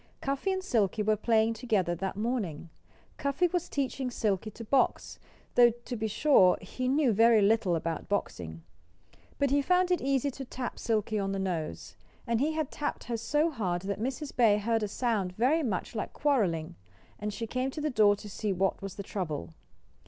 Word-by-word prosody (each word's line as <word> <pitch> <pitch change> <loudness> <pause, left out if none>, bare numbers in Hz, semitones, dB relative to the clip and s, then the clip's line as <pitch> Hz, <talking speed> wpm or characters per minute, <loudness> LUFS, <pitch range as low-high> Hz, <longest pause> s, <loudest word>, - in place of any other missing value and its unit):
Cuffy 275 +8 -1
and 375 0 -2
Silkie 215 - +1
were 215 +1 +3
playing 220 +1 +2
together 215 -7 0
that 190 +3 -3
morning. 205 -9 -3 0.5
Cuffy 280 +5 +1
was 350 0 -1
teaching 270 -2 -2
Silkie 215 -3 -1
to 230 - -10
box, 260 +4 +1 0.3
though, 240 -1 +7
to 240 +1 -7
be 220 -1 -2
sure, 210 -5 +4
he 250 +7 -4
knew 270 -2 +3
very 225 +2 +5
little 200 -3 +3
about 165 -1 -3
boxing. 85 - -3 0.7
But 280 -1 +1
he 285 0 +4
found 360 +4 +2
it 360 - +2
easy 275 +1 +1
to 270 - -7
tap 250 -1 -5
Silkie 215 -2 0
on 195 0 -1
the - - -2
nose. 170 - -4 0.3
And 230 -1 0
he 310 +3 +1
had 310 -3 -2
tapped 295 - -3
her 235 -1 -3
so 295 +8 +1
hard 185 - -2
that 200 +1 -3
Mrs. 270 +4 -4
Bear 220 -4 +5
heard 225 +2 0
a 210 - 0
sound 205 -4 -1
very 260 - +2
much 220 - -2
like 220 - -4
quarreling; 175 - 0 0.4
and 210 0 -3
she 230 +3 -4
came 255 +3 -2
to 285 - -6
the 300 0 -1
door 210 -4 +5
to 210 - -10
see 205 +1 -3
what 190 +1 0
was 195 -1 -6
the 200 - -6
trouble. 155 - -4
225 Hz, 190 wpm, -29 LUFS, 195-270 Hz, 0.7 s, though